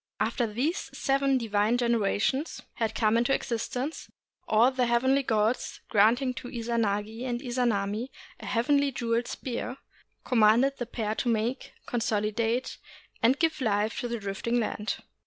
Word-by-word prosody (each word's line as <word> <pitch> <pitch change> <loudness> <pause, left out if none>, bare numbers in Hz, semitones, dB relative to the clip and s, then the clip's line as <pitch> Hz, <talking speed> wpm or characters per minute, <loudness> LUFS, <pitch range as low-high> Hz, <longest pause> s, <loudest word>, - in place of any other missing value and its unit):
After 240 -3 0
these 260 - -2
seven 275 -1 +2
divine 220 0 +1
generations 235 +4 0
had 225 -1 -2
come 220 +1 +3
into 240 +3 +3
existence, 250 +5 -3 0.4
all 230 +4 +5
the 255 -2 +1
heavenly 260 +4 +3
gods, 220 -1 0
granting 240 +5 +3
to 245 - -7
Izanagi 225 -2 -2
and 245 -2 -2
Izanami 240 -3 -1 0.3
a - - -8
heavenly 280 +4 +2
jeweled 235 -1 -1
spear, 250 0 -4 0.5
commanded 240 +4 +4
the 245 - -3
pair 220 -3 -2
to 240 - -1
make, 230 +3 -1
consolidate, 225 +1 -1 0.4
and 250 +4 +4
give 320 -2 0
life 215 -1 0
to 245 - -2
the 235 0 -3
drifting 210 +4 -2
land. 215 -1 -2
235 Hz, 140 wpm, -28 LUFS, 220-255 Hz, 0.5 s, all